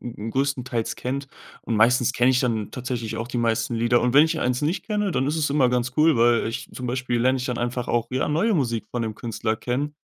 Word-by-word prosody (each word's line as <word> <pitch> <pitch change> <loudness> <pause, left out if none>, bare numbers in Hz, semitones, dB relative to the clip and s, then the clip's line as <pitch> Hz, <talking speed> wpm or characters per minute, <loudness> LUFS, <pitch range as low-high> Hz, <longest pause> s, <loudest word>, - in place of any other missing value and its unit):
größtenteils 120 +1 -2
kennt. 135 +2 -4 0.3
Und 115 - -2
meistens 120 +2 +4
kenne 125 +2 +3
ich 125 - +2
dann 115 -5 -1
tatsächlich 120 -3 -4
auch 115 +1 -4
die 125 - -3
meisten 115 0 0
Lieder. 120 +1 +2
Und 125 0 +1
wenn 145 +3 +7
ich 160 0 -1
1 125 +1 0
nicht 160 +6 -1
kenne, 210 -4 -1
dann 135 - 0
ist 155 - -1
es 155 -2 +1
immer 140 -3 +3
ganz 125 +1 -1
cool, 155 -3 +4
weil 115 -1 +3
ich 115 - -5
zum 125 -1 -5
Beispiel 125 -1 -1
lerne 130 +2 +2
ich 125 - -4
dann 125 -3 -3
einfach 120 0 -2
auch 120 -1 0
ja 130 +1 0
neue 170 +10 +1
Musik 115 -7 -1
von 120 - -2
'nem 110 -1 -3
Künstler 110 0 -2
kennen. 135 +6 -3
125 Hz, 240 wpm, -24 LUFS, 115-135 Hz, 0.3 s, wenn